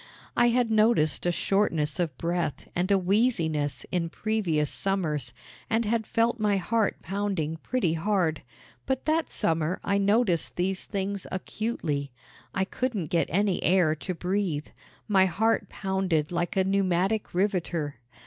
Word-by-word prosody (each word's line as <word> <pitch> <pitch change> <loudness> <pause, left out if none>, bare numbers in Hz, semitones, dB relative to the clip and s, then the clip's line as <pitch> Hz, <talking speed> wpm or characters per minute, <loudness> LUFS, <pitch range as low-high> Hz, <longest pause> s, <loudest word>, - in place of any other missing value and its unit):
I 240 - +5
had 240 -1 +2
noticed 215 -8 +3
a - - +3
shortness 170 -4 +1
of 160 -7 -1
breath 170 -3 -2
and 180 +2 0
a 200 - +6
wheeziness 175 - +1
in 170 -2 0
previous 175 -7 0
summers, 170 -8 -1 0.4
and 225 +1 +1
had 220 0 0
felt 230 +1 +1
my 210 -2 +2
heart 215 +3 0
pounding 190 -4 -2
pretty 185 -3 0
hard; 165 -2 0 0.5
but 265 -1 -1
that 315 +1 +1
summer 165 +2 0
I 200 0 +1
noticed 200 -3 +2
these 185 +1 -1
things 200 -1 -3
acutely. 180 -8 -2 0.4
I 190 - 0
couldn't 210 - -3
get 170 - +2
any 195 +2 +1
air 175 -2 +4
to 175 +4 -5
breathe. 180 -4 -1 0.4
My 190 -3 +4
heart 220 +6 +1
pounded 190 -6 -1
like 175 +2 -1
a 190 - +4
pneumatic 195 +1 +1
riveter. 175 - 0
190 Hz, 140 wpm, -27 LUFS, 165-210 Hz, 0.5 s, a